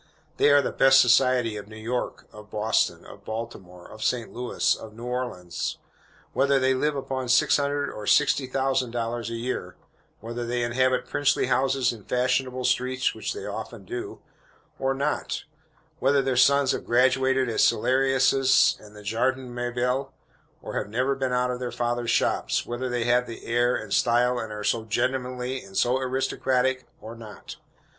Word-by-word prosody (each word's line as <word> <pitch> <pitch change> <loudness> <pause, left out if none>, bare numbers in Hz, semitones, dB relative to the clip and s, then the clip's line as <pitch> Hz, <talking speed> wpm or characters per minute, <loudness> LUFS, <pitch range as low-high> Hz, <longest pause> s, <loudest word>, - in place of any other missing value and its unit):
They - - +4
are 145 0 +5
the - - -2
"best 135 0 +6
society" 125 -3 +3
of 100 - -8
New 110 - -12
York, 120 +3 -4
of 105 0 -13
Boston, 110 +1 0
of - - -13
Baltimore, 100 -6 -7
of 110 - -9
St. 120 -3 -1
Louis, 125 0 0
of 110 -1 -11
New 115 - -10
Orleans, 125 -9 -4 0.6
whether 140 +1 +3
they 130 0 +2
live 150 +3 0
upon 130 -2 -4
six 125 - +4
hundred 145 0 -1
or 105 - -8
sixty 145 -2 +3
thousand 130 -1 0
dollars 115 0 -3
a 115 - -4
year 120 +2 -4 0.4
whether 120 +2 -5
they 120 0 -1
inhabit 130 +2 +1
princely 145 -1 +1
houses 135 -2 +1
in 110 -3 -12
fashionable 125 +1 0
streets 130 +1 +1
(which - - -4
they 415 - -7
often - - -7
do), 370 +2 -6 0.6
or 135 0 0
not 145 +2 -2 0.6
whether 135 +1 +3
their 130 -1 0
sons 140 +1 +4
have - - -3
graduated 130 +2 +2
at 115 - -2
Celarius's 135 +1 +3
and 105 0 -15
the 105 - -12
Jardin 125 +4 -1
Mabille, 125 +2 -1 0.5
or - - -6
have - - -6
never 130 +5 0
been 135 -1 -2
out 125 0 +1
of 125 - -4
their 125 -1 -4
father's 120 0 -2
shops - - +1
whether 125 +2 -4
they 120 -1 -1
have 120 +1 +2
"air" 120 +1 +1
and 110 -2 -4
"style," 120 +1 +2
and 110 - -5
are 105 0 -6
"so 115 +2 0
gentlemanly" 125 +3 -2
and 95 0 -9
"so 125 +2 +2
aristocratic," 130 0 0
or 110 - -9
not. 115 -3 -11
125 Hz, 170 wpm, -25 LUFS, 115-130 Hz, 0.6 s, best